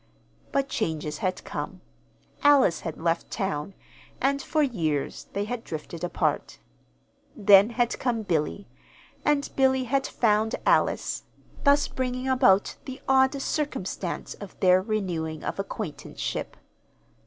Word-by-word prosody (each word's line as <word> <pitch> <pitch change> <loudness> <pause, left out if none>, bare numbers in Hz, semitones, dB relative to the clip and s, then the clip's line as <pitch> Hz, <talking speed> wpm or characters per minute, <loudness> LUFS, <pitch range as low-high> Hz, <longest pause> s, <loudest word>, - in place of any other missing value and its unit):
But 275 -1 +1
changes 160 - -2
had 185 -3 -2
come. - - -5 0.6
Alice 280 - +5
had 165 - -5
left 165 +1 0
town, 190 -3 -3 0.4
and 275 +1 +1
for 305 +3 +1
years 160 - -1
they 200 +1 -1
had 240 +1 -4
drifted 160 +1 -7
apart. 175 - -1 0.8
Then 205 0 +7
had 240 0 0
come 235 -4 0
Billy, 175 +2 -1 0.6
and 295 -1 +2
Billy 265 -1 +3
had 270 +2 0
found 220 -1 +2
Alice, - - +2 0.4
thus 285 +1 +5
bringing 255 0 -3
about 250 -7 +4
the 260 -1 -7
odd 265 +1 +4
circumstance 270 - -3
of 200 -2 -11
their 185 0 +5
renewing 175 -7 -2
of - - -4
acquaintanceship. 195 -5 -4
215 Hz, 120 wpm, -26 LUFS, 180-265 Hz, 0.8 s, Then